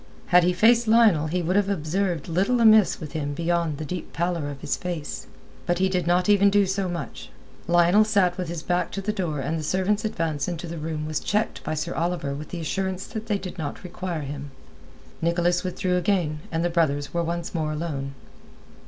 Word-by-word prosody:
Had 180 0 +6
he 180 - +3
faced 230 +6 +4
Lionel 215 -9 +5
he 175 +3 -1
would 180 +3 0
have 200 -1 +2
observed 175 -1 -1
little 195 +9 +1
amiss 220 -3 +6
with 155 -4 -7
him 145 -2 -3
beyond 170 -2 0
the 155 - -5
deep 180 +3 -6
pallor 170 -3 -1
of 140 -1 -7
his 145 - -1
face. 175 -5 -5 0.4
But 175 - +2
he 190 +1 +2
did 180 -3 -1
not 180 +1 +3
even 200 -1 +5
do 200 0 +4
so 190 0 -1
much. 115 - -6 0.4
Lionel 175 +4 +5
sat 200 -5 +2
with 180 -1 -4
his 165 -1 -5
back 180 0 0
to 195 - -3
the 210 +2 -1
door 165 -8 -2
and 155 +4 -2
the - - -5
servant's 190 +6 0
advance 160 -9 -1
into 175 -1 -4
the 170 -1 -6
room 155 -1 -3
was 155 -1 -2
checked 210 +2 -1
by 155 - -2
Sir 170 +3 -3
Oliver 170 -4 -1
with 145 +2 -7
the 175 - -5
assurance 190 +3 -2
that 220 0 -6
they 210 -2 +1
did 185 -2 -8
not 150 -2 -5
require 180 -2 -4
him. 145 0 -6 0.7
Nicholas 175 +1 +1
withdrew 180 0 -1
again, 175 -5 0
and 165 +1 0
the 175 - 0
brothers 145 -4 0
were 170 - +1
once 170 0 -3
more 155 -3 -1
alone. 145 -4 -4
175 Hz, 210 wpm, -25 LUFS, 155-190 Hz, 0.7 s, Had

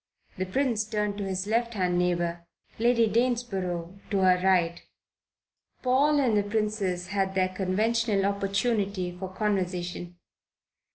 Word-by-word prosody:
The 185 - -1
Prince 235 +1 +1
turned 210 -1 -2
to 200 - -2
his 190 0 -2
left 230 +2 0
hand 180 -2 +1
neighbour; 175 -1 -1 0.3
Lady 235 0 +4
Danesborough 200 -6 -1
to 200 - 0
her 180 -1 +4
right. 175 -3 +2 1.0
Paul 280 +4 +3
and 245 -6 +2
the 205 - +4
Princess 205 -4 -1
had 195 -1 -1
their 185 -1 +2
conventional 205 +3 +1
opportunity 200 -2 0
for 185 +1 -6
conversation. 180 -3 -2
195 Hz, 125 wpm, -27 LUFS, 180-220 Hz, 1.0 s, Lady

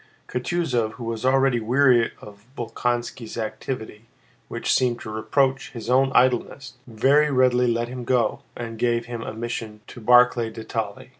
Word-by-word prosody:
Kutúzov, 125 -5 -1
who 120 - -9
was 115 0 -4
already 135 -1 +3
weary 120 +1 +3
of 105 +1 -14
Bolkónski's 120 0 -3
activity 110 0 -5 0.4
which - - -1
seemed 125 -2 +1
to 110 - -7
reproach 135 +5 0
his 120 0 -5
own 135 +1 +3
idleness, 125 0 +1
very 135 +6 +3
readily 125 -2 +3
let 115 0 -1
him 125 0 -7
go 120 -2 +1 0.2
and 115 -2 -6
gave 120 -1 +1
him 120 -1 -6
a - - -5
mission 115 -2 -5
to 120 - -12
Barclay 125 0 +4
de 110 0 -9
Tolly. 110 -2 -5
120 Hz, 155 wpm, -23 LUFS, 115-130 Hz, 0.4 s, Barclay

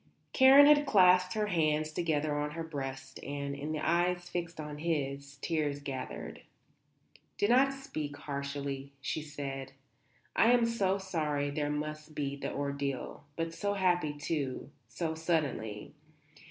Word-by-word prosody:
Karen 270 +2 +9
had 295 0 +6
clasped 185 -1 +5
her 215 -1 +1
hands 155 -5 +1
together 155 -2 0
on 145 0 -1
her 165 0 -4
breast 135 -3 -6
and, 140 0 -4
in 145 +2 -4
the 155 -1 -2
eyes 175 +1 +1
fixed 170 -2 -4
on 150 -1 -6
his, 140 -3 -2
tears 150 -4 0
gathered. 135 -2 -6 1.0
"Do 205 - +2
not 260 +4 +5
speak 155 - -5
harshly," 140 -1 -4
she 140 +3 -2
said. 135 -3 -6 0.6
"I 235 +2 +6
am 240 -1 +4
so 200 -5 +1
sorry 150 -7 -1
there 145 0 -1
must 155 +1 -4
be 140 -1 -2
the 140 - -4
ordeal. 140 -2 -3
But 165 0 -2
so 205 +3 -1
happy, 175 -6 +1
too 145 -3 -3 0.2
so 160 +8 -3
suddenly. 150 -11 -2
150 Hz, 140 wpm, -32 LUFS, 140-175 Hz, 1.0 s, Karen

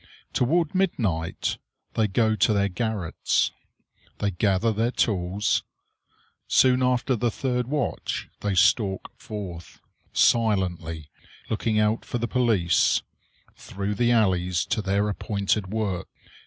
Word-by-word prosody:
Toward 160 +5 +1
midnight 110 - -1 0.3
they 110 -1 +2
go 110 +2 +2
to 110 +1 +3
their 100 -1 +2
garrets. 105 -4 -1 0.7
They 100 - 0
gather 100 +4 +1
their 115 +3 +1
tools. 100 -3 0 0.9
Soon 130 0 +4
after 125 +1 +2
the 120 +1 0
third 125 0 -2
watch 145 -2 -2
they 100 -2 -1
stalk 95 +1 +2
forth, 95 -6 -8 0.3
silently, 90 -9 +1 0.4
looking 110 0 0
out 105 +1 +2
for - - -3
the 120 0 -2
police, 110 -9 +2 0.5
through 100 +1 -4
the 120 +3 +1
alleys 90 -6 +2
to 110 - -1
their 100 +1 +1
appointed 100 -1 -1
work. 100 -3 -2
105 Hz, 115 wpm, -25 LUFS, 95-120 Hz, 0.9 s, Soon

